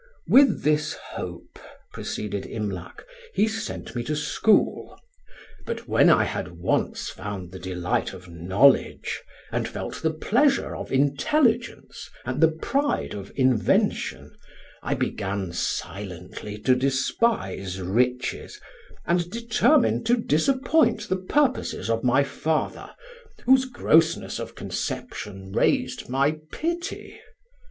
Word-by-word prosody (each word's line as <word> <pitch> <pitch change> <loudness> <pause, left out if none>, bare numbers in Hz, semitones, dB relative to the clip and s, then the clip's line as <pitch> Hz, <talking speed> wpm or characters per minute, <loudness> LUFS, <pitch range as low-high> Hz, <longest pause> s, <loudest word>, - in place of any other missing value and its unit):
"With 275 0 +5
this 150 0 +2 0.2
hope," - - -7 0.3
proceeded 100 -2 -4
Imlac, 100 -5 -5 0.3
"he 215 - +3
sent 220 - -5
me 120 - -1
to 150 - -1
school. 150 +8 +1 0.7
But 470 - -5
when - - +5
I - - +5
had - - -4
once - - -1
found 95 -2 -6
the 95 - -8
delight 90 -1 -2
of 90 -1 -11
knowledge, 95 +11 +2 0.3
and - - -1
felt - - -6
the 160 - +2
pleasure 245 - +1
of - - -7
intelligence 225 - +1 0.2
and - - -2
the 160 - +8
pride 275 - -1
of 100 -1 -7
invention, 130 -4 +1 0.5
I - - -1
began 95 -3 -2
silently 95 +2 -4
to 130 +4 +4
despise 130 - 0
riches, 125 +7 -1 0.5
and 175 0 +1
determined 235 - +2
to 240 +1 +4
disappoint 245 - +2
the 185 - +1
purposes 255 - 0
of 115 0 0
my 130 +3 +4
father, 155 +3 -2 0.6
whose 260 +1 +5
grossness 165 -10 +2
of - - -7
conception 95 -2 -5
raised - - 0
my 140 +4 +1
pity. 345 +3 -4
140 Hz, 115 wpm, -25 LUFS, -, 0.7 s, the